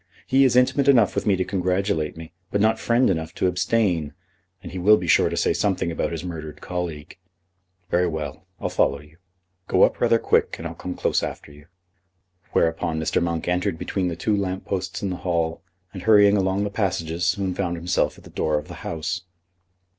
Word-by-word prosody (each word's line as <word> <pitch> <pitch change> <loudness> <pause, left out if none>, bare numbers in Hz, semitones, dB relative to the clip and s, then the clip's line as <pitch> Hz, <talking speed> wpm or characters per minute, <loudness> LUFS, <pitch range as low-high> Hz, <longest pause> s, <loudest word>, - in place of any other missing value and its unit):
He 135 +1 +4
is 125 - +3
intimate 130 +2 +3
enough 120 -7 +5
with 100 +1 -2
me 100 - +4
to 95 - 0
congratulate 90 -4 -1
me, 80 0 -10 0.2
but 100 - 0
not 110 +2 +3
friend 120 +2 +2
enough 80 -1 -2
to - - 0
abstain, 90 -3 +1 0.5
and - - -8
he 95 - -5
will 105 +4 +6
be 90 - -4
sure 85 - +4
to - - -4
say - - +2
something 95 -4 0
about 80 - -2
his 85 0 -4
murdered 80 -4 -7
colleague. 90 -3 -5 0.7
Very 90 +1 +3
well; 80 +1 -5
I'll - - -2
follow 70 +1 +1
you. 75 +2 -18 0.5
Go - - +4
up - - +2
rather - - +4
quick, - - +1
and 85 - -5
I'll 85 - -7
come 90 +3 -6
close - - +1
after - - -6
you." 75 +2 -16 0.8
Whereupon 80 0 +1
Mr. 80 - 0
Monk 85 -1 -2
entered 90 0 0
between 95 +3 -2
the 85 - -2
two 105 +6 0
lamp 95 -2 -2
posts 95 -1 -3
in 100 - -1
the 90 - -3
hall, 85 -2 -1 0.3
and, 95 - -7
hurrying 105 -1 +6
along 95 0 +1
the 105 - -2
passages, 85 -5 -2
soon 95 0 0
found 90 -2 -2
himself 90 +2 0
at - - -16
the - - -14
door 75 -1 0
of 75 - -6
the - - -7
House. 85 +2 -3
90 Hz, 205 wpm, -23 LUFS, 80-100 Hz, 0.8 s, will